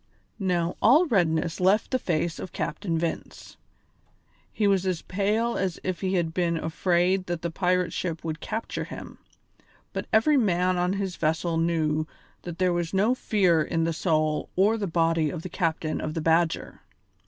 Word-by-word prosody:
Now 175 -3 0
all 290 +11 +6
redness 170 - +1
left 190 +4 +2
the 255 - +1
face 170 -3 -1
of - - -7
Captain 170 -5 -2
Vince. 165 0 -5 1.0
He 215 - -1
was 195 -2 +3
as 180 -3 -1
pale 215 +5 0
as 185 -3 -2
if 185 -1 -3
he 190 -1 0
had 165 -2 0
been 170 -2 0
afraid 180 +3 +1
that 175 -1 -3
the 170 - -2
pirate 180 -1 0
ship 165 -3 -3
would 160 -1 -4
capture 225 +1 -4
him, - - -9 0.7
but - - -4
every 280 +7 +4
man 185 -5 +2
on 180 +1 +1
his 195 -2 -3
vessel 165 +2 0
knew 160 -2 0 0.3
that 175 -1 -7
there 185 -1 +2
was 175 +1 -2
no 210 +6 +3
fear 190 -9 +2
in 165 +1 -1
the 165 0 0
soul 155 -2 0
or 200 +4 +4
the 210 -3 -2
body 165 -2 +1
of 165 +1 -6
the 185 - -6
captain 160 -3 -1
of 155 - -4
the 165 - -1
Badger. 165 +1 +1
175 Hz, 175 wpm, -26 LUFS, 165-190 Hz, 1.0 s, all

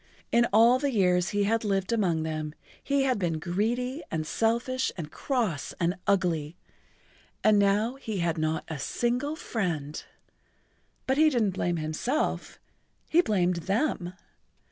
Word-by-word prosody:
In 235 0 +4
all 230 +4 +6
the 285 +1 0
years 180 -5 +2
he 205 0 +1
had 225 +3 +1
lived 195 +1 0
among 175 -8 +1
them 155 -1 -4 0.3
he 280 -1 +1
had 255 -5 +1
been 170 -4 0
greedy 235 - -1
and 160 -1 -2
selfish 235 +7 0
and 155 -3 -6
cross 230 - -2
and 170 0 +1
ugly, 170 -5 +1 0.9
and 215 -1 +5
now 210 +5 +2
he 220 -6 -4
had 170 -2 0
not 155 0 0
a 155 -3 -5
single 245 - -1
friend. 170 - -3 1.0
But 265 +1 +1
he 310 +1 +6
didn't 230 -8 +1
blame 175 -2 -1
himself, 160 - -2 0.5
he 340 - +5
blamed 180 - +1
them. 195 - 0
200 Hz, 145 wpm, -28 LUFS, 170-240 Hz, 1.0 s, all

